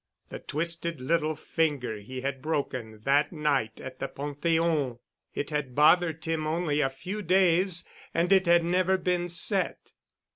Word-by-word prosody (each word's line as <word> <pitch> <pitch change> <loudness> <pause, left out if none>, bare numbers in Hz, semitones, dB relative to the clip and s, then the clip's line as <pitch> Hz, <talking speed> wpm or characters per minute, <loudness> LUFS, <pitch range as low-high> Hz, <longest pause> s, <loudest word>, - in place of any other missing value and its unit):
The - - -7
twisted 170 0 -3
little 155 +3 0
finger 145 -10 -1
he 130 +5 -7
had 135 0 -3
broken 130 -8 -3
that 145 +3 +3
night 145 -9 -1
at 130 0 -9
the - - -2
Pantheon. 145 -1 -1 0.4
It 145 - -3
had 145 -4 -3
bothered 160 +1 +4
him 160 -1 -1
only 155 -2 0
a 135 - +2
few 180 +11 -6
days 180 -1 +2 0.2
and 175 +3 +2
it 190 -2 +4
had 170 0 +5
never 185 +2 +2
been 180 -1 -1
set. 185 +3 0
155 Hz, 150 wpm, -28 LUFS, 140-175 Hz, 0.4 s, had